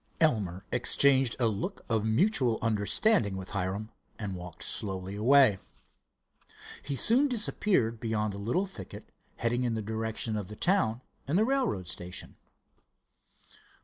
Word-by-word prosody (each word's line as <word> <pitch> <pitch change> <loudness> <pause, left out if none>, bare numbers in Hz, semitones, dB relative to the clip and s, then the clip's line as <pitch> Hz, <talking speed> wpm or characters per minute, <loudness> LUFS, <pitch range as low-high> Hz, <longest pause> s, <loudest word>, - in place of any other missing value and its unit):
Elmer 100 - +1
exchanged 130 +1 +4
a 120 - +2
look 115 - -3
of 110 -2 0
mutual 120 - +2
understanding 105 - +1
with 95 -1 -8
Hiram, 100 +3 -3 0.3
and 105 -3 -4
walked 90 -1 -7
slowly 95 -1 -2
away. 120 -2 +5 1.2
He 140 - -3
soon 245 - +5
disappeared 210 - 0
beyond 110 -2 -1
a 100 - -7
little 120 - 0
thicket, 105 - -11 0.2
heading 120 +1 -1
in 120 -2 0
the 110 - -2
direction 110 +1 -3
of 100 -3 -4
the 105 - -9
town 165 - +1 0.3
and 150 +6 +1
the 215 - +3
railroad 250 - 0
station. 90 +1 -6
110 Hz, 135 wpm, -29 LUFS, 100-140 Hz, 1.2 s, away